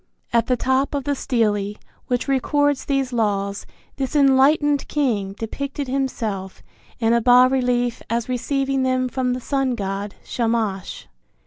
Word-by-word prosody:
At 235 -1 +3
the 250 - +2
top 260 +3 +1
of 280 - -2
the 285 - 0
stele 210 -6 0 0.3
which 245 +2 -1
records 290 +1 +1
these 270 -2 -1
laws 200 -3 -1 0.3
this 270 +1 -3
enlightened 285 +1 +4
king 220 -10 0
depicted 275 +6 -5
himself 225 -8 -3 0.4
in 225 -1 +2
a 235 - +3
bas 250 +2 +6
relief 245 -2 0
as 230 0 -1
receiving 270 +2 -1
them 255 0 +1
from 250 0 -1
the 250 - -3
sun 270 -1 -1
god, 200 0 -4
Shamash. 225 -5 -2
250 Hz, 140 wpm, -22 LUFS, 225-270 Hz, 0.4 s, bas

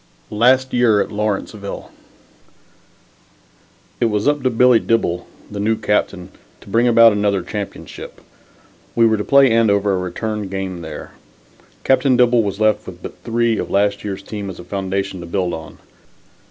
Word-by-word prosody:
LAST 130 +4 +3
YEAR 120 -4 +3
AT - - -1
LAWRENCEVILLE 105 -1 -4 2.1
It - - +2
was 105 +1 0
up 145 0 +2
to 130 - +1
Billy 125 0 +4
Dibble, 90 -7 -1 0.2
the 100 - -5
new 110 +2 +1
captain, 95 -4 -1 0.3
to - - -15
bring 115 +4 +2
about 115 -1 +7
another 100 -2 0
championship. 105 +1 -7 0.8
We 115 - +4
were 110 -1 +3
to 105 - -2
play 140 0 +5
Andover 105 -3 +2
a - - 0
return 105 +3 -4
game 95 -2 -4
there. 80 -2 -8 0.7
Captain 130 -1 +3
Dibble 120 -1 +4
was 100 -1 -3
left 110 0 +1
with - - -10
but - - -9
three 115 -1 0
of - - -4
last 100 0 +1
year's 100 -1 -5
team 100 -1 -6
as 95 - -8
a - - -8
foundation 95 +1 -3
to 85 - -8
build 90 0 -1
on. 80 -1 -8
105 Hz, 160 wpm, -19 LUFS, 100-115 Hz, 2.1 s, about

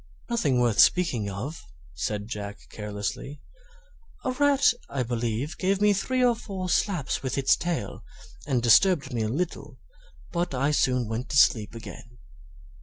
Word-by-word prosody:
"Nothing 150 - +1
worth 120 -3 +1
speaking 130 - +4
of," 115 - -6 0.3
said 100 +6 -3
Jack, 100 -3 -6
carelessly; 105 +7 -5 0.9
"a 255 - +1
rat, 280 +1 +3 0.2
I 135 -2 -1
believe, 120 +5 -3
gave 195 +1 +1
me 210 0 +4
three 255 +6 0
or 240 -1 +3
four 195 -5 -6
slaps 175 -5 0
with 130 0 -3
its 135 - +4
tail, 170 - -4 0.4
and 125 -5 0
disturbed 140 - +4
me 115 - -1
a 110 - -1
little; 145 -1 -4 0.5
but 170 -5 -2
I 140 +3 +1
soon 125 -5 +1
went 115 +3 -4
to 140 - 0
sleep 110 -5 +4
again." 120 +1 -10
135 Hz, 150 wpm, -26 LUFS, 115-180 Hz, 0.9 s, speaking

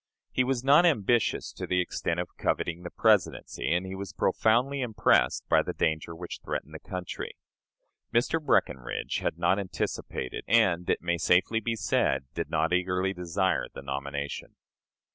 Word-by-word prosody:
He 130 - +2
was 130 -1 -1
not 140 +5 +6
ambitious 120 - +2
to - - -6
the 90 - +1
extent 90 - -1
of - - -5
coveting 85 +1 -1
the 90 - -6
Presidency, 100 - +1
and 90 +2 +1
he 95 - -6
was 95 -3 -6
profoundly 125 - +2
impressed 110 - +2
by - - +4
the - - -4
danger 80 +1 -1
which 85 +1 -7
threatened - - -4
the - - -7
country. 90 -1 -6 0.8
Mr. 135 +7 +1
Breckinridge 65 - 0
had - - -2
not 85 +3 +2
anticipated, 90 -8 -4
and 95 -7 +3
it - - +1
may 85 0 0
safely 90 +7 +3
be 115 +1 -2
said 95 - +1
did - - -3
not 80 +3 +1
eagerly 90 +1 +1
desire, 90 +1 0
the - - -7
nomination. 70 +1 -5
90 Hz, 160 wpm, -28 LUFS, 85-115 Hz, 0.8 s, not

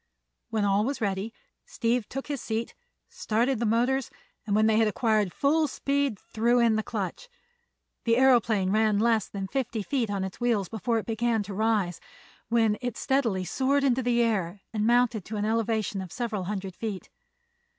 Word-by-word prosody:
When 215 -2 0
all 200 +1 +3
was 275 +5 -2
ready 200 0 -2 0.4
Steve 245 - -1
took 270 +1 -5
his 285 -3 -4
seat, 225 +1 -3 0.3
started 235 +3 0
the 235 - 0
motors, 245 +4 +1 0.4
and 205 - +1
when 215 +1 +4
they 220 0 +3
had 225 -1 +4
acquired 215 -3 +1
full 305 - +2
speed 280 -3 -1
threw 235 +2 +1
in 230 -2 +4
the 220 - +1
clutch. 225 - -5 0.8
The 230 -1 +4
aëroplane 230 -7 +3
ran 215 -1 +3
less 225 -1 +2
than 195 -1 -5
fifty 240 -3 -2
feet 245 -2 -1
on 200 -2 -2
its 190 +4 -7
wheels 225 -6 +1
before 230 +1 -1
it 220 - -3
began 225 -1 0
to 200 0 -7
rise, 210 -4 0 0.5
when 225 -2 +2
it 245 -3 -3
steadily 230 -9 0
soared 275 +7 +1
into 260 -2 +2
the 240 -1 +2
air 195 -4 -1
and 215 0 0
mounted 240 -3 +3
to 215 - -5
an 205 - -1
elevation 220 -2 0
of 185 -3 -8
several 225 -6 -3
hundred 195 -1 -4
feet. 210 -5 -5
225 Hz, 180 wpm, -27 LUFS, 210-245 Hz, 0.8 s, when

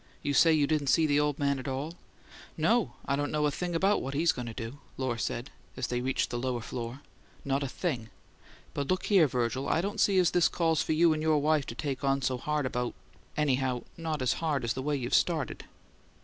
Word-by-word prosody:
"You 145 - 0
say 165 +4 +6
you 155 -2 +4
didn't 150 -1 0
see 160 +4 +4
the 145 -1 +3
old 150 -1 +1
man 140 -1 +1
at 130 - -7
all?" 140 +5 -3 0.6
"No, 220 +9 +2
I 140 - +1
don't 145 +1 -1
know 150 -1 +1
a 145 - +2
thing 175 +4 -3
about 195 +5 +3
what 135 +1 -4
he's 160 +3 +4
going 125 -4 -6
to - - -4
do," 115 +5 -6 0.2
Lohr 130 -3 -1
said, 120 +3 -3 0.3
as 130 - -1
they 125 0 -2
reached 130 +1 0
the 120 - -2
lower 125 -1 -2
floor. 120 +4 -6 0.4
"Not 135 0 0
a 140 - -1
thing. 130 -6 -3 0.6
But 140 -1 -2
look 185 +3 0
here, 190 -7 +5
Virgil, 125 +2 -1
I - - +2
don't 205 +5 -2
see 195 -2 +4
as 180 -3 +4
this 175 -1 +4
calls 165 -3 +1
for - - 0
you 165 +1 +5
and 155 - -3
your 155 -1 +3
wife 150 -1 +2
to 115 - -6
take 140 +1 -3
on 135 0 +1
so 125 0 0
hard 150 +1 -1
about 125 -1 -2 0.4
anyhow 130 -4 +1
not 160 -4 -3
as 125 - +2
hard 150 -6 0
as 115 0 0
the 130 - -4
way 145 +2 0
you've 125 -3 -3
started." 160 -5 +1
145 Hz, 235 wpm, -29 LUFS, 130-160 Hz, 0.6 s, say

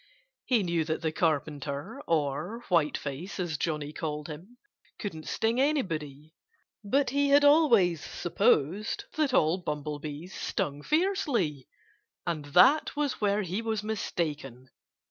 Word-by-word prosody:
He 235 -5 +2
knew 170 -2 0
that 160 +1 -3
the 160 - +1
Carpenter 150 -3 -2
(or 165 - -1
Whiteface, 160 +1 -1
as 175 -3 -2
Johnnie 150 -2 -2
called 150 -2 -4
him) 180 +11 -10 0.4
couldn't 160 -7 -6
sting 230 +3 +1
anybody. 160 - -2 0.5
But 265 +6 +1
he 285 +1 +2
had 285 +1 +6
always 230 - +5
supposed 170 +6 +1
that 305 -3 +1
all 165 -5 +3
bumblebees 150 +1 -5
stung 145 0 -3
fiercely. 265 - 0 0.6
And 160 -4 -2
that 180 - +5
was 290 -5 -1
where 205 0 +2
he 190 +4 -3
was 220 -2 -2
mistaken. 150 - -4
170 Hz, 125 wpm, -29 LUFS, 150-225 Hz, 0.6 s, had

